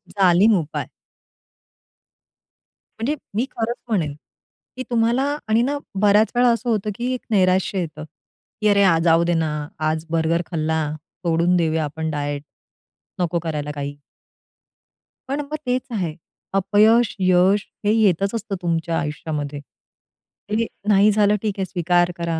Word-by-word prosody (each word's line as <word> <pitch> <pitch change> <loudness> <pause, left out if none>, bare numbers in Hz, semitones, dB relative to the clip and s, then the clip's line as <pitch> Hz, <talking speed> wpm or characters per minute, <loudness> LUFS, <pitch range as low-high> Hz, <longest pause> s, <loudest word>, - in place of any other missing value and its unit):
जालीम 195 +2 +5
उपाय. 155 -2 -4 2.1
म्हणजे 270 +7 0 0.2
मी 230 +4 +1
खरंच 235 +1 -2
म्हणेन, 170 -10 0 0.6
की 255 - -3
तुम्हाला 235 +2 +2 0.2
आणि 220 +2 +3
ना, 280 +4 0 0.2
बऱ्याच 210 +1 +4
वेळा 245 0 +4
असं 235 +1 -1
होतं 215 -2 0
की 245 +3 -2
एक 255 - -4
नैराश्य 190 -1 +2
येतं, 155 -3 -5 0.6
की 215 - +2
"अरे 200 -1 +4
यार, 190 -4 +5
आज 165 - 0
जाऊ 165 0 +4
दे 175 - +1
ना, 160 -2 0 0.3
आज 155 +1 -1
बर्गर 165 +1 +1
खाल्ला, 160 -1 0 0.4
सोडून 170 +2 +2
देऊया 160 -2 +1
आपण 160 +2 -3
डाएट, 145 -1 -3 0.8
नको 170 0 0
करायला 150 -3 -3
काही." 145 0 -4 1.3
पण 280 +2 -1
मग 295 +1 -5
तेच 250 +1 +1
आहे. 180 -8 -2 0.4
अपयश, 210 +4 +4
यश 185 +2 +3 0.2
हे 205 - +4
येतच 200 -3 +2
असतं 205 -3 -3
तुमच्या 165 -1 -1
आयुष्यामध्ये. 150 -1 -4 0.9
हे, 225 +2 +1 0.2
नाही 210 0 +5
झालं 210 0 +3
ठीक 215 -2 -1
आहे 190 - 0
स्वीकार 175 -1 +1
करा, 170 -1 -2
185 Hz, 140 wpm, -22 LUFS, 160-215 Hz, 2.1 s, जालीम